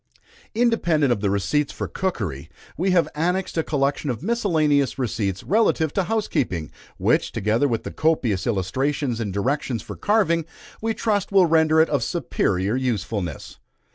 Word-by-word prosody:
Independent 175 - +2
of 105 - -5
the 100 - +1
receipts 100 +10 0
for - - -4
cookery, 90 - -3 0.3
we 185 +5 0
have 175 -4 +3
annexed 180 +5 -1
a 165 - +2
collection 145 0 -1
of 125 +3 -3
miscellaneous 155 - +1
receipts 105 -7 -2
relative 185 -8 +2
to 195 - 0
housekeeping, 130 - -1 0.3
which, - - +1
together 110 +7 +1
with 115 -4 -2
the - - -6
copious 125 - 0
illustrations 120 - -1
and 105 -4 -2
directions 120 +3 -1
for - - -8
carving, 195 -6 +2 0.4
we 225 0 -1
trust 205 -4 0
will 195 -2 +6
render 160 -1 +4
it 160 - +4
of 145 -3 +1
superior 110 - -1
usefulness. 105 - -3
145 Hz, 150 wpm, -23 LUFS, 110-175 Hz, 0.4 s, will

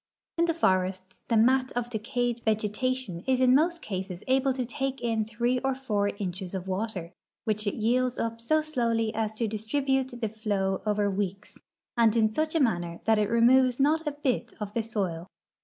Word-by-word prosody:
In 335 - +5
the 330 -1 0
forests 185 - 0
the 230 - +2
mat 255 +3 +4
of 245 0 -2
decayed 240 +2 -2
vegetation 220 -2 -1
is 260 -1 +3
in 255 -1 +5
most 335 +4 +2
cases 185 -3 -5
able 265 +1 +3
to 255 -1 -2
take 270 +3 -3
in 225 -2 0
three 240 +3 0
or 270 0 0
four 210 -6 0
inches 190 -1 -4
of 190 0 -5
water, 190 -3 -3 0.3
which 215 -1 -1
it 205 - 0
yields 250 +3 +1
up 230 0 -3
so 310 +7 +2
slowly 230 -7 0
as 220 -1 -1
to 230 +1 -1
distribute 260 +5 0
the 225 - 0
flow 205 -3 -1
over 210 -1 +2
weeks 200 0 -3 0.4
and 230 -2 +4
in 220 -2 +3
such 310 +6 -1
a - - +4
manner 175 - 0
that 220 -1 +4
it 210 -1 +1
removes 250 +2 +4
not 305 +3 +2
a 290 - -2
hit 255 -4 0
of 210 -1 -5
the 230 - +1
soil. 190 -7 -3
225 Hz, 190 wpm, -28 LUFS, 205-255 Hz, 0.4 s, In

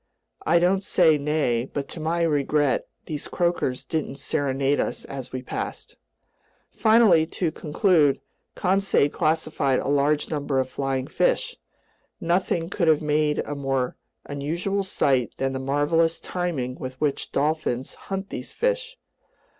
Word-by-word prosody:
I 170 - +5
don't 180 +3 +3
say 165 -6 +4
nay, 140 -5 0
but 140 -1 -3
to - - -7
my 165 +2 0
regret 145 -2 +1 0.2
these 150 -3 -5
croakers 170 -8 -1
didn't 155 -4 -2
serenade 140 0 0
us - - -2
as 135 -2 -7
we 130 -1 -5
passed. - - -5 0.8
Finally, 215 -8 +5
to 170 -1 -1
conclude, 155 -2 +2 0.4
Conseil 190 -5 +2
classified 155 -4 +1
a - - -2
large 145 +1 +2
number 145 -2 -1
of 130 0 -1
flying 135 -2 -1
fish. - - 0 0.6
Nothing 170 -1 0
could 175 -1 -1
have 155 -1 +4
made 150 0 +1
a 145 - -4
more 135 -3 -1 0.3
unusual 170 +8 -2
sight 135 -9 +1
than 135 0 -1
the 130 - -3
marvelous 145 +5 +1
timing 155 -9 -3
with 130 0 -6
which 145 -2 -1
dolphins 145 -4 -1 0.2
hunt 195 0 -3
these - - -6
fish. - - -1
150 Hz, 140 wpm, -25 LUFS, 135-170 Hz, 0.8 s, I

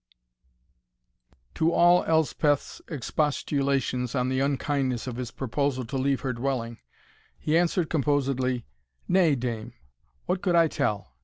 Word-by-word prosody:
To 160 +1 +2
all 175 +1 +5
Elspeth's 155 -2 +1
expostulations 140 -3 -1
on 125 -1 +1
the 130 0 0
unkindness 135 -2 0
of 125 -2 -5
his 125 -2 -4
proposal 135 +1 -2
to 115 - -6
leave 135 0 +1
her 130 -2 -2
dwelling, 120 -2 -3 0.6
he 155 - 0
answered 170 0 +1
composedly, 135 -4 0 0.4
"Nay, 175 -5 +4
dame, 120 -2 -4 0.5
what 180 +1 -1
could 180 -3 +1
I 165 -1 +5
tell? 100 - -2
135 Hz, 125 wpm, -26 LUFS, 125-155 Hz, 0.6 s, all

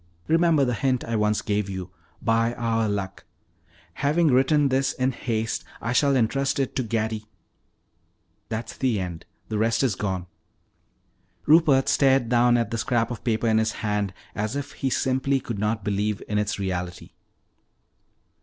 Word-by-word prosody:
Remember 165 -3 +4
the 125 - 0
hint 130 +1 0
I 115 - -3
once 105 0 +1
gave 105 -2 -1
you 95 -1 -6 0.3
By 115 +1 +2
Our 115 -2 0
Luck. 100 -2 -4 0.7
Having 150 - +2
written 140 +2 +3
this 135 +1 +1
in 130 +1 0
haste, 115 -3 -2 0.2
I 115 - -2
shall 140 +2 +3
intrust 135 +3 +1
it 135 -1 -1
to - - +2
Gatty 110 -2 -2 0.6
" - - -45
"That's 110 0 -4
the 125 -6 0
end; 90 -3 -6 0.2
the 110 -1 -1
rest 115 +3 +2
is 125 -5 +2
gone." 95 -2 -3 1.2
Rupert 150 -4 +5
stared 135 -4 +3
down 120 0 +4
at 115 -2 -1
the 115 - -2
scrap 120 -1 0
of 120 - -6
paper 115 -1 0
in 110 0 +3
his 110 - 0
hand 105 -2 0 0.2
as 110 +4 -3
if 145 0 -4
he 135 - -2
simply 130 +2 +1
could 115 -5 -5
not 105 0 -1
believe 105 +1 -1
in 105 0 0
its 105 0 -1
reality. 90 -2 -4
115 Hz, 165 wpm, -25 LUFS, 105-130 Hz, 1.2 s, Rupert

